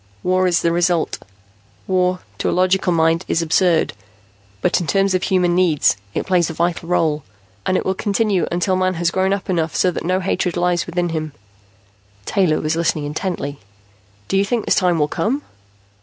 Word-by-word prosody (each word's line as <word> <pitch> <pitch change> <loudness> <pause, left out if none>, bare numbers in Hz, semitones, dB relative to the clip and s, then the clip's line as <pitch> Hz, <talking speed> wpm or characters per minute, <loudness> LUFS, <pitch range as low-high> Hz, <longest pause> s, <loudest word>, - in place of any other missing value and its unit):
War 185 0 +2
is 175 -1 +1
the 170 - +2
result. 175 -1 +1 0.7
War, 185 -1 +1 0.2
to - - 0
a - - -1
logical 185 0 +2
mind, 165 +1 +2
is 165 - +1
absurd. 165 0 +2 0.7
But - - +1
in 170 - -4
terms 195 +5 +2
of 185 - +1
human 180 -2 +2
needs, 175 -5 +3 0.2
it - - -1
plays 180 -2 +2
a - - -4
vital 170 0 -1
role. 155 -4 +1 0.5
And 185 - +2
it - - -2
will 190 - +1
continue 205 -1 0
to - - -10
until 180 +2 +1
Man 185 0 +1
has 170 0 0
grown 190 +1 +1
up 200 -1 -2
enough 165 -4 -1
so 185 - +2
that - - -5
no 185 +2 +1
hatred 180 -2 -1
lies 175 0 +1
within 175 0 -1
him." 155 -2 -4 0.9
Taylor 180 -6 +1
was 155 +1 -1
listening 160 -2 0
intently. 145 -2 -4 0.7
"Do 195 - 0
you 195 - +4
think 220 +2 -1
this - - +3
time 180 -3 +2
will 150 -2 +2
come?" 240 - -1
180 Hz, 190 wpm, -19 LUFS, 165-185 Hz, 0.9 s, you